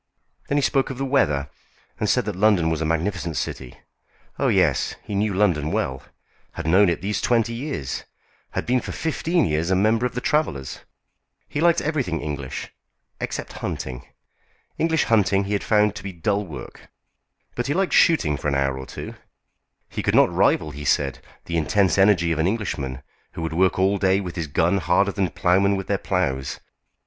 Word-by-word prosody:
Then 145 Hz, -, +1 dB
he 145 Hz, -, +2 dB
spoke 135 Hz, 0 st, +1 dB
of 135 Hz, -, -5 dB
the 135 Hz, -, -2 dB
weather, 75 Hz, -, +1 dB, 0.5 s
and -, -, 0 dB
said -, -, +2 dB
that 105 Hz, -3 st, -3 dB
London 95 Hz, -5 st, +3 dB
was 80 Hz, -1 st, -1 dB
a -, -, 0 dB
magnificent 85 Hz, +1 st, -1 dB
city. 65 Hz, -2 st, -5 dB, 0.6 s
Oh, -, -, +2 dB
yes, -, -, +2 dB
he -, -, -7 dB
knew 105 Hz, +1 st, +1 dB
London 85 Hz, -7 st, +2 dB
well, 65 Hz, 0 st, -1 dB, 0.5 s
had 85 Hz, -, -6 dB
known 95 Hz, +4 st, +5 dB
it 85 Hz, 0 st, -2 dB
these 105 Hz, +2 st, -1 dB
twenty 115 Hz, -1 st, +1 dB
years; 120 Hz, -, -4 dB, 0.5 s
had -, -, -2 dB
been 125 Hz, 0 st, +2 dB
for -, -, -6 dB
fifteen 165 Hz, +2 st, 0 dB
years 80 Hz, +2 st, 0 dB
a 95 Hz, -, +3 dB
member 110 Hz, +5 st, +2 dB
of 120 Hz, -, -12 dB
the -, -, 0 dB
Travellers'; 100 Hz, -, -1 dB, 0.7 s
he 145 Hz, -, -3 dB
liked 170 Hz, 0 st, +4 dB
everything 135 Hz, -, -1 dB
English, 70 Hz, -2 st, -5 dB, 0.5 s
except -, -, -4 dB
hunting. 65 Hz, -2 st, -5 dB, 0.7 s
English 160 Hz, -1 st, +2 dB
hunting 100 Hz, -3 st, +3 dB
he 100 Hz, +1 st, -3 dB
had 100 Hz, -, -1 dB
found 105 Hz, -1 st, +3 dB
to 105 Hz, -, -8 dB
be 100 Hz, -, -5 dB
dull 100 Hz, +3 st, -1 dB
work. 65 Hz, -7 st, -10 dB, 0.6 s
But 120 Hz, +1 st, -3 dB
he 145 Hz, -, 0 dB
liked 190 Hz, 0 st, +1 dB
shooting 80 Hz, -, +4 dB
for -, -, -4 dB
an 70 Hz, -, +1 dB
hour 70 Hz, -1 st, 0 dB
or 65 Hz, -, -8 dB
two. -, -, -7 dB, 0.7 s
He -, -, -4 dB
could -, -, +1 dB
not -, -, +5 dB
rival, 80 Hz, -1 st, +2 dB
he 75 Hz, +1 st, -8 dB
said, 70 Hz, -1 st, +1 dB, 0.3 s
the 85 Hz, -, -2 dB
intense 95 Hz, +5 st, +2 dB
energy 95 Hz, -4 st, +4 dB
of 80 Hz, -, -1 dB
an 80 Hz, -, +2 dB
Englishman, 70 Hz, -, -3 dB, 0.3 s
who 80 Hz, -, -5 dB
would 80 Hz, -1 st, -3 dB
work 95 Hz, +3 st, +2 dB
all 95 Hz, +1 st, +2 dB
day 95 Hz, 0 st, +3 dB
with 90 Hz, -4 st, -6 dB
his 85 Hz, -3 st, -3 dB
guns 85 Hz, +7 st, +1 dB
harder 90 Hz, +4 st, +2 dB
than 95 Hz, -2 st, -1 dB
ploughmen 95 Hz, +4 st, +2 dB
with 95 Hz, -, -4 dB
their 100 Hz, -1 st, -1 dB
ploughs. 65 Hz, -9 st, -1 dB
95 Hz, 190 wpm, -23 LUFS, 80-110 Hz, 0.7 s, known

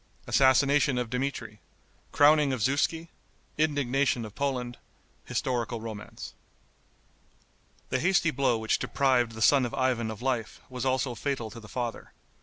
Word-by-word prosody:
Assassination 140 Hz, +1 st, +3 dB
of 120 Hz, -2 st, -3 dB
Dmitri. 125 Hz, -5 st, -3 dB, 0.5 s
Crowning 150 Hz, -1 st, +5 dB
of 125 Hz, -, -3 dB
Zuski. 160 Hz, +6 st, 0 dB, 0.5 s
Indignation 140 Hz, -5 st, +1 dB
of 105 Hz, -, -10 dB
Poland. 125 Hz, -3 st, -3 dB, 0.5 s
Historical 120 Hz, -2 st, -2 dB
Romance. 110 Hz, -2 st, -8 dB, 1.6 s
The 130 Hz, -, 0 dB
hasty 170 Hz, +1 st, +2 dB
blow 135 Hz, -4 st, +1 dB
which 110 Hz, 0 st, 0 dB
deprived 125 Hz, -4 st, +1 dB
the 110 Hz, 0 st, -2 dB
son 135 Hz, +3 st, +5 dB
of 120 Hz, -, -3 dB
Ivan 125 Hz, -4 st, 0 dB
of 110 Hz, +2 st, -7 dB
life 125 Hz, -4 st, -2 dB
was 125 Hz, 0 st, -4 dB
also 130 Hz, -1 st, 0 dB
fatal 120 Hz, -2 st, -3 dB
to 115 Hz, -, -9 dB
the 105 Hz, -2 st, -13 dB
father. 120 Hz, -3 st, -5 dB
130 Hz, 135 wpm, -28 LUFS, 115-140 Hz, 1.6 s, Crowning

